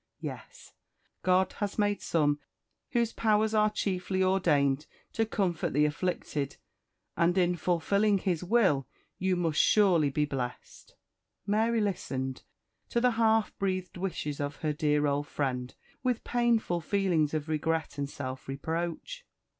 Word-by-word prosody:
Yes! - - -8 0.5
God 185 0 +2
has 205 -1 -2
made 205 -1 +1
some 145 -3 +1 0.5
whose 235 -2 +1
powers 220 0 +2
are 215 0 +4
chiefly 190 -2 -1
ordained 150 -7 +2 0.3
to 225 0 +1
comfort 185 -6 -1
the 150 +2 +4
afflicted, 150 -3 -2 0.6
and 175 +2 +2
in 180 -1 +3
fulfilling 200 +5 +2
His 180 -3 -1
will 180 - +3 0.3
you 185 0 +1
must 165 -4 +2
surly 180 -8 +4
be 150 +2 +1
blest." 130 -4 -6 0.5
Mary 220 +3 +2
listened 135 -10 -2 0.5
to 235 - +1
the 250 +1 +3
half 225 -1 +2
breathed 185 -2 -2
wishes 175 -6 -3
of 145 0 -2
her 150 - +1
dear 150 -1 +1
old 145 0 0
friend 125 -4 -3 0.3
with 250 -2 0
painful 235 -7 +1
feelings 165 -4 +1
of 155 0 -2
regret 160 -1 -1
and 140 -1 -2
self 130 -2 -6
reproach. 170 - -4
175 Hz, 135 wpm, -29 LUFS, 150-205 Hz, 0.6 s, are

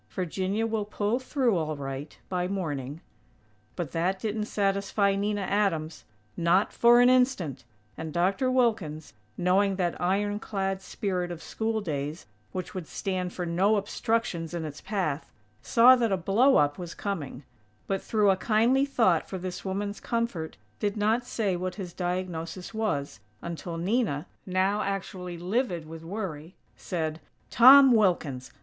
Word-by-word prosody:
Virginia 190 +4 -2
will 220 -2 -1
pull 210 +3 -1
through 255 -4 +1
all 155 -3 -2
right, 135 +1 -6
by 180 -1 -1
morning." 155 -6 -4 0.7
But 170 -5 -4
that 180 +4 0
didn't 215 +1 -2
satisfy 200 -1 +1
Nina 205 +1 -1
Adams, 190 -5 -1 0.3
not 170 +4 +2
for 240 +1 +6
an 245 - +6
instant, 250 - +2 0.4
and 160 -1 -5
Dr. 190 - +1
Wilkins, 210 - 0 0.2
knowing 190 +2 +2
that 180 -3 -2
ironclad 195 0 -1
spirit 185 -3 -3
of 170 -2 -7
school 220 0 -2
days 150 -3 -4 0.3
which 185 - -5
would 180 -4 -6
stand 185 -2 -3
for 180 - -4
no 185 +6 +2
obstructions 200 -5 -1
in 165 -2 -3
its 150 -1 -7
path, 185 -8 -2 0.3
saw 240 - +7
that 235 -4 0
a 190 - +2
"blow 220 +10 +3
up" 145 +1 +3
was 175 -2 -7
coming; 155 -9 -4 0.4
but, 195 -1 -1
through 210 -3 +3
a - - +3
kindly 235 +7 +2
thought 205 - +2
for 190 - -4
this 185 0 -6
woman's 200 +2 -3
comfort, 230 -9 -3 0.2
did 205 0 -1
not 225 +4 +1
say 210 -6 0
what 180 +1 -3
his 185 -4 -7
diagnosis 180 0 -4
was, 145 - -2 0.2
until 170 0 -5
Nina, 180 - 0 0.2
now 190 +3 +1
actually 185 -3 -4
livid 180 -2 -1
with 165 0 -9
worry, 170 -3 -6 0.2
said: 160 -3 -3 0.3
"Tom 265 +2 +9
Wilkins! 170 - +1
190 Hz, 145 wpm, -27 LUFS, 170-210 Hz, 0.7 s, Tom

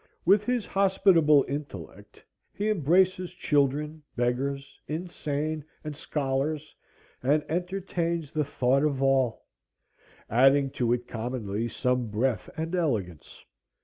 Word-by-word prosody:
With 200 +4 +5
his 245 -3 0
hospitable 190 -7 +4
intellect 140 - -7 0.3
he 210 +2 -1
embraces 180 +1 +2
children, 150 +1 0
beggars, 135 +3 -2
insane, 155 -2 -3 0.2
and 150 -1 -5
scholars, 145 +1 -2 0.5
and 145 +4 +2
entertains 170 -2 -2
the 155 -1 0
thought 135 -1 +1
of 140 -3 0
all, 135 -4 +2 0.8
adding 135 +3 +4
to 120 -2 0
it 120 0 0
commonly 115 -2 -3
some 125 0 0
breadth 110 +2 -1
and 165 +2 -3
elegance. 110 - -2
145 Hz, 110 wpm, -27 LUFS, 130-165 Hz, 0.8 s, With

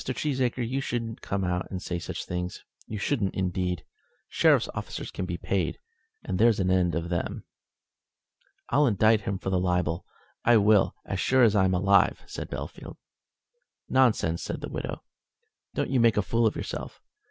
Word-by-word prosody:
Cheesacre, 130 -3 -1
you 135 +3 -1
shouldn't 115 -4 -3
come 100 -1 -2
and 90 +1 -2
say 90 -2 -4
such - - -5
things; 90 0 -4 0.2
you 105 - -5
shouldn't, 105 -2 -1
indeed. 90 -2 -1 0.4
Sheriff's - - +4
officers - - -5
can 90 - -4
be 90 -1 -3
paid, 90 -1 -1 0.5
and 95 -1 -2
there's 115 -1 +4
an 95 -1 +1
end 90 -2 +2
of 85 +1 -2
them." 85 -1 -2 1.3
"I'll 145 0 +4
indict 110 0 +4
him 100 -1 -2
for 95 0 -4
the 95 - +2
libel 90 -2 0 0.4
I 120 -1 +6
will, 105 -1 +4
as - - -3
sure 130 -1 +4
as 110 -3 +5
I'm 95 -2 +3
alive," 100 +2 +3
said - - -7
Bellfield. - - -7 0.9
"Nonsense," 110 -11 +3
said - - -4
the - - -5
widow. - - -5 0.7
"Don't - - -1
you 130 - +3
make 115 -2 +4
a 105 - +3
fool 115 +2 +2
of - - -1
yourself. - - -6
100 Hz, 165 wpm, -27 LUFS, 90-115 Hz, 1.3 s, I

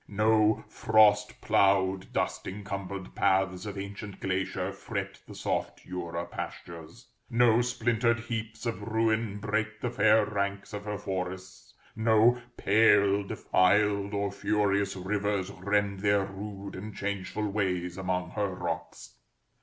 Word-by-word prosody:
No 110 +1 +2
frost 110 -1 +3
ploughed, 95 -1 +2
dust - - -2
encumbered 100 -1 -6
paths 95 0 +1
of 100 -1 -6
ancient 100 +1 -7
glacier 95 0 -2
fret 100 -1 -5
the - - -10
soft - - -3
Jura 85 -2 -4
pastures; 85 +8 -8 0.2
no 120 -1 +4
splintered 120 -1 +1
heaps 115 -1 -5
of 115 -2 -2
ruin 110 -1 0
break 105 0 -2
the 120 - -2
fair 110 0 +4
ranks 100 -1 -3
of 105 0 -5
her 105 -1 -3
forests; 95 -1 -6 0.2
no 115 +2 +4 0.2
pale, 100 -1 +4
defiled, 100 +1 +2
or 100 0 -1
furious 100 0 +1
rivers 100 0 -1
rend 100 +1 0
their 100 0 +2
rude 100 0 -7
and 105 +2 -7
changeful 100 +1 -3
ways 90 -4 -1
among 90 -2 -2
her 105 0 -1
rocks. - - -5
100 Hz, 125 wpm, -29 LUFS, 95-110 Hz, 0.2 s, no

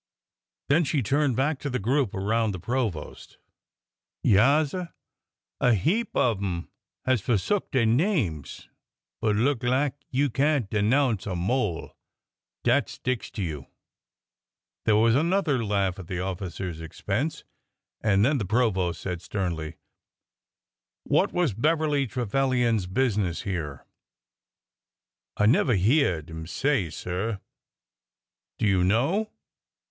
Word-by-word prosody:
Then 160 +5 +4
she 145 -3 0
turned 140 +2 +1
back 135 +3 0
to 145 - -4
the 125 - -1
group 125 +1 0
around 110 +2 0
the 95 - -5
provost. 110 -6 -4 0.9
Yaassir! 145 - +3 0.7
A 125 -2 +4
heap 200 - 0
of 115 -5 +2
'em 90 -3 -3 0.3
has 130 -4 +2
forsook 120 - 0
dey 130 -3 +2
names, 115 - 0 0.5
but 110 -2 +2
look 125 +3 +1
lak 130 +3 +1 0.2
you 135 +1 +1
can't 140 -2 +1
denounce 110 +1 +2
a 95 - -2
mole 95 -1 0
1 - - -13 0.7
Dat - - +2
sticks 130 -3 -3
to 100 - -4
you 80 -4 -3
1 - - -19 0.6
" - - -66
There 110 - +4
was 115 +2 +4
another 155 -3 +2
laugh 100 -3 0
at 90 - -9
the 90 0 -3
officer's 90 -2 -4
expense, 100 - -3 0.6
and 105 -1 +3
then 140 +1 +2
the 105 - -2
provost 95 -6 +1
said 90 -3 -4
sternly: 85 -5 -3 0.7
'' - - -66 0.5
What - - +2
was 175 - +1
Beverly 150 +3 +1
Trevilian's 120 -2 0
business 100 -5 0
here?" 80 -9 -4 1.5
I 105 - +3
never 125 +2 +4
hyeahed 95 - +2
'im 80 0 -7
say, 130 - 0
sir." 95 +7 -3 0.7
'' - - -66
Do - - 0
you 95 -3 +3
know 140 - +1
110 Hz, 130 wpm, -26 LUFS, 95-135 Hz, 1.5 s, Then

